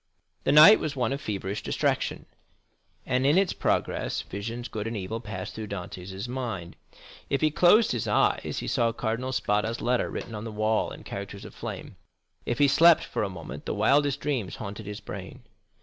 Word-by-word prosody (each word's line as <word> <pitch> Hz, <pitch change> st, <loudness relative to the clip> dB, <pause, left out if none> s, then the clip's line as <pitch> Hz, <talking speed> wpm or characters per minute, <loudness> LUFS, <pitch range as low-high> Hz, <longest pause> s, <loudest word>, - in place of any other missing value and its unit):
The -, -, +3 dB
night 155 Hz, +9 st, +9 dB
was 155 Hz, -2 st, -3 dB
one 125 Hz, -1 st, 0 dB
of 140 Hz, -, -4 dB
feverish 100 Hz, -1 st, -3 dB
distraction, -, -, -1 dB, 0.8 s
and 130 Hz, 0 st, +1 dB
in 145 Hz, +5 st, +4 dB
its 195 Hz, -1 st, +3 dB
progress -, -, -1 dB
visions, 115 Hz, +5 st, -5 dB
good 110 Hz, 0 st, -4 dB
and 115 Hz, -1 st, -3 dB
evil, 100 Hz, +4 st, -4 dB
passed 95 Hz, -5 st, -6 dB
through 110 Hz, -1 st, -6 dB
Dantès' 95 Hz, +1 st, -6 dB
mind. 115 Hz, -9 st, -4 dB, 0.5 s
If 140 Hz, -, 0 dB
he 155 Hz, -1 st, +3 dB
closed 195 Hz, +8 st, +5 dB
his 120 Hz, -3 st, -2 dB
eyes, -, -, +1 dB
he -, -, -5 dB
saw 115 Hz, -1 st, +1 dB
Cardinal 115 Hz, +3 st, -2 dB
Spada's 110 Hz, -2 st, 0 dB
letter 125 Hz, 0 st, +1 dB
written 115 Hz, -, -6 dB
on 105 Hz, 0 st, -5 dB
the 115 Hz, -, -5 dB
wall 110 Hz, +1 st, +1 dB
in -, -, -10 dB
characters -, -, -7 dB
of -, -, -10 dB
flame—if 120 Hz, -, -8 dB
he 145 Hz, -, +5 dB
slept 165 Hz, +4 st, +6 dB
for -, -, -3 dB
a 100 Hz, -, -1 dB
moment 85 Hz, -4 st, -8 dB
the -, -, -1 dB
wildest 145 Hz, 0 st, +3 dB
dreams 130 Hz, -10 st, -2 dB
haunted 105 Hz, -4 st, -7 dB
his 105 Hz, 0 st, -6 dB
brain. -, -, -8 dB
115 Hz, 180 wpm, -27 LUFS, 105-140 Hz, 0.8 s, night